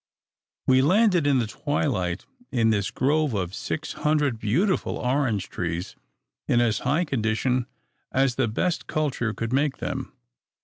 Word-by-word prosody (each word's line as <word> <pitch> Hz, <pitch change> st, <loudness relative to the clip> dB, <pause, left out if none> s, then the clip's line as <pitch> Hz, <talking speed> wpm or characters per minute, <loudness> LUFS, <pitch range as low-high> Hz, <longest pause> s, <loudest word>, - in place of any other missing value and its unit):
We 130 Hz, 0 st, +5 dB
landed 180 Hz, 0 st, +4 dB
in 140 Hz, -2 st, +4 dB
the 120 Hz, -, +1 dB
twilight 105 Hz, -, -1 dB, 0.3 s
in 115 Hz, -3 st, +3 dB
this 100 Hz, -3 st, 0 dB
grove 145 Hz, -1 st, +1 dB
of 90 Hz, -2 st, -2 dB
six 155 Hz, +9 st, -4 dB
hundred 150 Hz, -6 st, +1 dB
beautiful 175 Hz, -, +1 dB
orange 125 Hz, -6 st, 0 dB
trees 85 Hz, +1 st, -4 dB, 0.5 s
in 120 Hz, -, +3 dB
as 115 Hz, -2 st, +2 dB
high 150 Hz, +8 st, +1 dB
condition 125 Hz, -1 st, 0 dB, 0.4 s
as 135 Hz, -1 st, +2 dB
the 130 Hz, -1 st, +1 dB
best 165 Hz, +11 st, -1 dB
culture 140 Hz, -7 st, -1 dB
could 115 Hz, +3 st, -4 dB
make 140 Hz, +1 st, +1 dB
them. -, -, -4 dB
130 Hz, 140 wpm, -25 LUFS, 110-150 Hz, 0.5 s, We